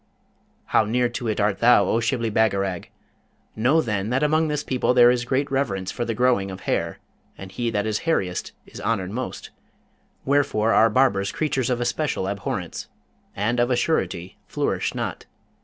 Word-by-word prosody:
How - - +3
near 120 +3 +1
to 120 0 -5
it 110 -1 -1
art 105 -1 +1
thou, 115 -4 +5
O 115 - +1
Shibli 115 -1 -1
Bagarag! 100 -4 0 0.7
Know, 130 +9 +3
then, 105 -2 -2
that 130 +4 +1
among 155 +2 +2
this 150 -1 -2
people 125 -1 0
there 120 -1 +7
is 120 -1 -1
great 135 +3 -1
reverence 100 -9 -1
for 120 - -3
the 115 - -2
growing 120 -5 +2
of 95 0 -8
hair, - - -2 0.4
and 95 -1 -9
he 120 +4 -2
that 105 -2 -1
is 110 -1 -1
hairiest 95 - -1
is - - -11
honoured 100 -5 -1
most, 125 +4 -5 0.7
wherefore 135 -6 +2
are 115 - +5
barbers 105 -5 +2
creatures 135 -5 -1
of 125 -1 0
especial 120 -4 -1
abhorrence, 100 0 -4 0.5
and 115 +5 0
of 120 +1 +2
a 125 - +2
surety 95 - -1
flourish - - -2
not. - - -4
115 Hz, 175 wpm, -23 LUFS, 100-130 Hz, 0.7 s, there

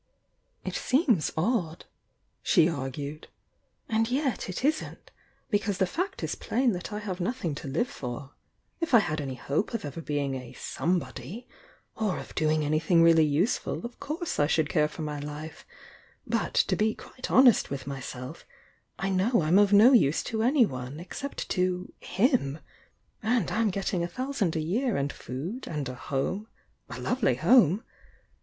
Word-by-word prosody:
"It - - -3
seems 255 - +2
odd," 175 -3 0 0.6
she 170 -6 +4
argued 145 0 -4 0.3
— - - -46
"and 225 +1 +1
yet, 260 -6 -1
it 185 +8 -3
isn't. 310 +2 -2 0.4
Because 205 -2 +1
the 190 - +3
fact 360 - -3
is - - -1
plain 250 +1 +1
that 180 0 -5
I 210 - -3
have 200 -3 -4
nothing 180 - -2
to - - -7
live 155 - 0
for. 135 - -6 0.5
If 330 -7 +2
I - - +11
had 155 -7 -1
any 135 -2 -4
hope 150 - -1
of 225 - -3
ever 145 +3 -6
bein^ 145 -3 -1
a 125 -2 -8
'some 170 +7 -1
body' 165 - -7 0.5
or 215 -4 -1
of - - -8
doing 155 -1 +1
anything 165 +3 +3
really 165 -1 +6
useful 165 +10 0
of 240 - -8
course 320 +4 -3
I 145 - +4
should 155 -1 +1
care 150 -3 +3
for 155 +1 -7
my 150 -1 -3
life, 150 +2 -8 0.6
but, - - -1
to - - +3
be 215 0 +1
quite 255 - -8
honest 255 -3 +6
with 135 -1 -5
myself, 130 -2 -7 0.5
I 195 - -1
know 190 +2 +2
I'm 170 +6 +5
of 205 -1 +4
no 215 +6 +8
use 160 - +4
to 220 -1 -2
anyone, 155 - +1
except 275 +11 -6
to 180 0 -1
— - - -41 0.2
himf 195 - +2 0.6
And 225 -3 +1
I'm 225 0 +2
getting 195 -2 -1
a - - -1
thousand 245 -4 -2
a 160 - 0
year 225 - 0
and 140 0 -1
food 170 - -6
and 150 -4 -3
a 125 - -4
home 150 - -3 0.2
— - - -40
a - - -6
lovely 250 - +1
home! 195 - +5
180 Hz, 175 wpm, -28 LUFS, 150-230 Hz, 0.6 s, I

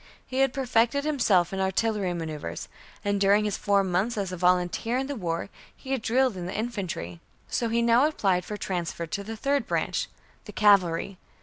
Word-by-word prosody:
He 260 0 -3
had 270 -1 +4
perfected 255 +1 +1
himself 215 - +2
in 195 - -2
artillery 190 0 0
maneuvers; 155 - -5 0.4
and 200 -1 0
during 205 +2 +4
his 210 - -1
four 200 -1 +2
months 190 +5 0
as 195 -3 -2
a - - -3
volunteer 180 +6 +1
in 265 - -1
the 285 +1 -4
War, 170 -4 -3 0.3
he 265 - -8
had 265 -3 0
drilled 250 0 +2
in 175 -1 -5
the 185 - -4
infantry. 195 - -4 0.3
So 235 - -1
he 235 +1 +1
now 235 +5 +5
applied 195 -12 +1
for 210 +3 -6
transfer 175 -3 -3
to 200 +5 -4
the 220 +2 -6
third 280 +4 0
branch, - - -1 0.4
the - - -10
cavalry. 195 -3 +3
205 Hz, 190 wpm, -27 LUFS, 180-235 Hz, 0.4 s, now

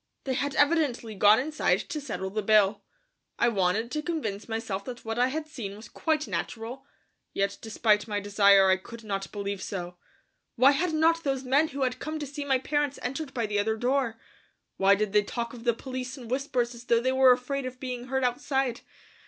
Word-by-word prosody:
They 265 - -1
had 280 +2 -1
evidently 290 -7 +2
gone 205 +2 +6
inside 305 +4 +1
to 305 - -5
settle 200 -8 -4
the 215 +2 -1
bill. 205 -1 +4 0.6
I 235 - +3
wanted 205 +2 0
to 305 - -1
convince 235 - -4
myself 225 -3 -3
that 245 -2 -8
what 225 +1 -3
I 250 - +4
had 305 +4 -3
seen 210 -9 -6
was 215 +1 -11
quite 310 +3 -1
natural, 245 +4 -5 0.5
yet 200 0 -1
despite 215 -1 +1
my 205 -1 -1
desire 200 -1 +5
I 190 - +4
could 230 +4 -11
not 195 -2 -4
believe 200 -1 -4
so. 180 -3 -5 0.6
Why 260 +3 +6
had 325 +5 0
not 330 +1 +3
these 270 -2 -1
men 275 +5 +3
who 275 -2 -3
had 255 -1 -1
come 310 +1 -4
to 300 - -4
see 285 +1 -6
my 270 -2 +2
parents 290 +1 -1
entered 270 +3 -3
by 235 -4 -1
the 205 -1 -1
other 220 +2 0
door? 245 -1 0 0.6
Why 195 +1 +5
did 210 0 -2
they 210 - +6
talk 235 +3 -4
of 240 -1 -10
the 235 - +4
police 260 +1 -6
in 240 -4 -10
whispers 255 -2 -1
as 235 0 -12
though 235 -1 +3
they 260 +2 +1
were 260 -1 +6
afraid 255 +2 0
of 255 0 -9
being 250 -1 -5
heard 265 0 -1
outside? 255 0 0
245 Hz, 205 wpm, -27 LUFS, 210-275 Hz, 0.6 s, gone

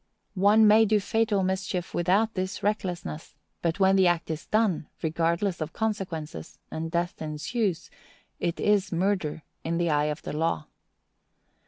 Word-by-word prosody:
One 210 +2 +6
may 220 +2 +7
do 215 0 +3
fatal 210 -1 +1
mischief 190 -1 -2
without 195 +6 +2
this 185 +1 -3
recklessness; 180 -7 -3 0.3
but 170 +2 -1
when 190 0 +5
the 190 -2 +5
act 170 -2 0
is 160 0 -5
done, 215 -8 +1 0.2
regardless 170 +3 0
of 155 0 -4
consequences, 180 - -4
and 165 +1 -3
death 175 +1 -2
ensues, 170 +4 -2 0.5
it 170 - -2
is 205 -2 +2
murder 175 -4 0 0.2
in 165 +1 -1
the 170 -1 +1
eye 150 0 +2
of 150 0 -3
the - - -5
law. 155 - 0
180 Hz, 150 wpm, -27 LUFS, 160-205 Hz, 0.5 s, may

